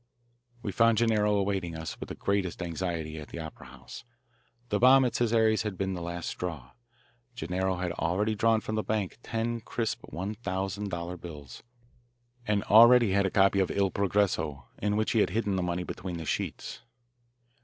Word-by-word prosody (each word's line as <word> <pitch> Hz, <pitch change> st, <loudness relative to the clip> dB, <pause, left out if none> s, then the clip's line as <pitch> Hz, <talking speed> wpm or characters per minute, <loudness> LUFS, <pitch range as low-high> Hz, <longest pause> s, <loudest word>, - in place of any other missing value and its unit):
We 100 Hz, -, -2 dB
found 115 Hz, +3 st, +4 dB
Gennaro 105 Hz, -2 st, +3 dB
awaiting 95 Hz, -4 st, -1 dB
us 80 Hz, 0 st, -6 dB
with -, -, -7 dB
the -, -, -5 dB
greatest 95 Hz, -3 st, -1 dB
anxiety 85 Hz, -2 st, -3 dB
at 75 Hz, -, -9 dB
the -, -, -9 dB
opera 80 Hz, -5 st, -8 dB
house. 65 Hz, -, -11 dB, 0.7 s
The 105 Hz, -, +1 dB
bomb 130 Hz, +2 st, +7 dB
at 120 Hz, -, -1 dB
Cesare's 110 Hz, -2 st, +2 dB
had 105 Hz, -3 st, -4 dB
been 95 Hz, 0 st, -1 dB
the 90 Hz, -, -5 dB
last 85 Hz, 0 st, -5 dB
straw. 75 Hz, -8 st, -5 dB, 0.6 s
Gennaro 95 Hz, 0 st, -1 dB
had 90 Hz, -1 st, -2 dB
already 95 Hz, +6 st, 0 dB
drawn 110 Hz, +1 st, +2 dB
from 110 Hz, 0 st, -3 dB
his 110 Hz, -, -1 dB
bank 105 Hz, -1 st, -2 dB
ten 115 Hz, 0 st, -2 dB
crisp 115 Hz, 0 st, -3 dB
one 95 Hz, +7 st, -4 dB
thousand 100 Hz, -1 st, -3 dB
dollar 85 Hz, 0 st, -4 dB
bills, 75 Hz, -7 st, -10 dB, 0.9 s
and 105 Hz, -1 st, +1 dB
already 120 Hz, 0 st, +7 dB
had 100 Hz, 0 st, +3 dB
a -, -, -1 dB
copy 100 Hz, +1 st, +3 dB
of 95 Hz, -, +2 dB
Il 100 Hz, -1 st, +1 dB
Progresso 90 Hz, -9 st, 0 dB
in 105 Hz, +1 st, 0 dB
which 110 Hz, +2 st, +1 dB
he 115 Hz, -, +2 dB
had -, -, +3 dB
hidden 105 Hz, -3 st, -1 dB
the 95 Hz, -, 0 dB
money 90 Hz, 0 st, -2 dB
between 90 Hz, -1 st, -5 dB
the 80 Hz, -, -6 dB
sheets. -, -, -4 dB
95 Hz, 180 wpm, -29 LUFS, 85-110 Hz, 0.9 s, bomb